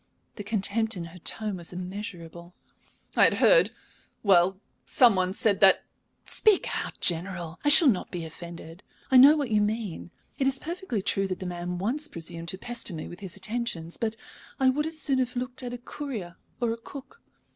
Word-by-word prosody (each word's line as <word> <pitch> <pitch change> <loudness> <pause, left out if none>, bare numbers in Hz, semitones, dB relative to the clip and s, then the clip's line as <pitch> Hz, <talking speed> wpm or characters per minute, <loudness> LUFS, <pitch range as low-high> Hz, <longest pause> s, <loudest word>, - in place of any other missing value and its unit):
The 205 - -7
contempt 215 +1 0
in 175 - -4
her 170 +2 -12
tone 210 +3 -1
was 170 -1 -1
immeasurable. 180 -2 -8 0.6
"I - - +6
had - - +3
heard - - +5 0.5
well, 190 -1 +4 0.2
some 240 -5 +4
one 185 0 +1
said 200 0 +1
that 195 -2 +5 0.2
" - - -46
"Speak 430 -4 +4 0.2
out, - - -8
General; 175 -1 -2
I 290 - +3
shall 315 +2 +9
not 210 -8 +1
be 170 -2 -5
offended. 170 +1 -10 0.3
I 260 - +7
know 280 +4 +9
what 280 -6 -2
you 210 -1 +3
mean. 210 -5 -3 0.3
It 270 - +2
is 270 0 +2
perfectly 330 - -4
true 195 -1 0
that 185 -1 -4
the 185 - -6
man 175 0 -4
once 255 +11 -1
presumed 170 - -7
to 190 +2 -1
pester 235 -4 -4
me 155 - -6
with 175 - -10
his 190 -2 -5
attentions. 195 -5 -4
But 225 -1 -2 0.4
I 265 -1 +4
would 300 +4 -1
as 320 0 -5
soon 275 -4 +1
have 250 -1 -1
looked 250 +1 -3
at 245 -1 -5
a 245 - -5
courier 240 -9 -7 0.2
or 235 -2 0
a 230 - -3
cook. 275 - -12
205 Hz, 195 wpm, -27 LUFS, 175-250 Hz, 0.6 s, shall